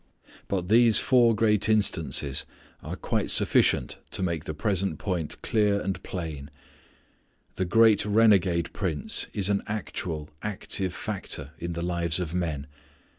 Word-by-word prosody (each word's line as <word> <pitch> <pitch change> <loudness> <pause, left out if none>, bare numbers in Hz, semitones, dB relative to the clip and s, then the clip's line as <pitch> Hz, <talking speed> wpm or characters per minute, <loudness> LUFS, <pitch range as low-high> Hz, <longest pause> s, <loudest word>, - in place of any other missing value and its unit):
But 90 -3 -2
these 115 +1 +5
four 120 -3 +4
great 105 -1 +2
instances 80 -9 +1 0.4
are - - -6
quite - - -2
sufficient - - +3
to - - -1
make 85 -4 -2
the 80 - -5
present 95 -1 -1
point 90 -6 -3
clear 105 -2 +2
and 95 -1 -3
plain. 80 -6 -6 1.0
This 95 - -2
great 110 +2 +5
renegade 95 -6 +3
prince 80 -8 0
is 100 -3 -1
an 100 -1 +1
actual 85 -7 -5
active 100 -2 -3
factor 100 -9 -5
in 85 0 -4
the 85 0 -4
lives 85 -1 -1
of 85 -3 -4
men. 80 -6 -2
95 Hz, 135 wpm, -26 LUFS, 85-105 Hz, 1.0 s, these